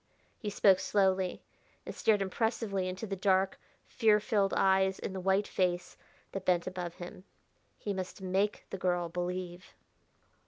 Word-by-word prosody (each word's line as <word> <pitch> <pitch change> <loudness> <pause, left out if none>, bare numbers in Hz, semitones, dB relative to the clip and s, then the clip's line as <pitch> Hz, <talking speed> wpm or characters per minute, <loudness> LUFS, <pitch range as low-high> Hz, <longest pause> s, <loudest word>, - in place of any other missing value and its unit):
He 210 - -3
spoke 195 -2 +5
slowly, 190 -1 +1 0.4
and - - -5
stared 210 -3 +2
impressively 200 -1 -1
into 185 +4 -5
the 195 -2 -3
dark, 190 0 +2 0.3
fear 220 -3 +3
filled 205 -3 +1
eyes 190 0 +3
in - - -5
the 190 - -4
white 190 +2 +2
face 180 -1 -1 0.4
that 195 - -4
bent 175 -2 +2
above 180 -2 -5
him. 180 +1 -9 0.5
He 205 - -3
must 185 0 -5
make 190 +2 0
the 195 - -4
girl 175 -1 0
believe. 180 +1 -5
190 Hz, 150 wpm, -31 LUFS, 180-200 Hz, 0.5 s, spoke